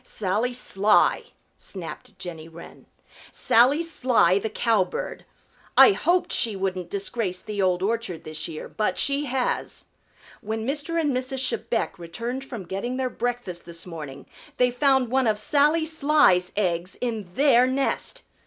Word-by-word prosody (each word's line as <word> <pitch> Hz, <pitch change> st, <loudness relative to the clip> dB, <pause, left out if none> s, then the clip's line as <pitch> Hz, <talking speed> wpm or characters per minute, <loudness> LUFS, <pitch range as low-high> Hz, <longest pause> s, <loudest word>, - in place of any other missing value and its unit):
"Sally 215 Hz, +3 st, -1 dB
Sly," 210 Hz, -4 st, +2 dB, 0.3 s
snapped 180 Hz, -4 st, -8 dB
Jenny 165 Hz, -3 st, -7 dB
Wren. 165 Hz, +1 st, -13 dB, 0.4 s
"Sally 260 Hz, +8 st, +4 dB
Sly 250 Hz, -, +2 dB
the 220 Hz, -, -3 dB
Cowbird. 215 Hz, -4 st, -1 dB, 0.5 s
I -, -, +9 dB
hoped 360 Hz, -2 st, +1 dB
she 225 Hz, -4 st, +2 dB
wouldn't 190 Hz, -2 st, -3 dB
disgrace 195 Hz, -2 st, -2 dB
the 210 Hz, -1 st, -4 dB
Old 185 Hz, -1 st, +1 dB
Orchard 215 Hz, -5 st, -2 dB
this 155 Hz, 0 st, -4 dB
year, 160 Hz, -2 st, -7 dB
but 215 Hz, -, -2 dB
she 280 Hz, +2 st, +1 dB
has. 260 Hz, -2 st, -2 dB, 0.6 s
When 220 Hz, 0 st, -4 dB
Mr. 300 Hz, +4 st, -1 dB
and 295 Hz, -5 st, 0 dB
Mrs. 260 Hz, +1 st, -1 dB
Chebec 225 Hz, -4 st, -2 dB
returned 230 Hz, +10 st, -5 dB
from 240 Hz, -7 st, -7 dB
getting 195 Hz, +8 st, -4 dB
their 260 Hz, -1 st, -1 dB
breakfast 240 Hz, -7 st, -4 dB
this 170 Hz, 0 st, -5 dB
morning 150 Hz, -6 st, -8 dB, 0.3 s
they 250 Hz, 0 st, +3 dB
found 265 Hz, -1 st, +2 dB
one 260 Hz, -2 st, +2 dB
of 215 Hz, -1 st, +2 dB
Sally 300 Hz, +6 st, +2 dB
Sly's 295 Hz, -, +3 dB
eggs 180 Hz, -2 st, -1 dB
in 220 Hz, -7 st, -4 dB
their 260 Hz, -3 st, +5 dB
nest. 275 Hz, -, -1 dB
230 Hz, 145 wpm, -24 LUFS, 185-265 Hz, 0.6 s, I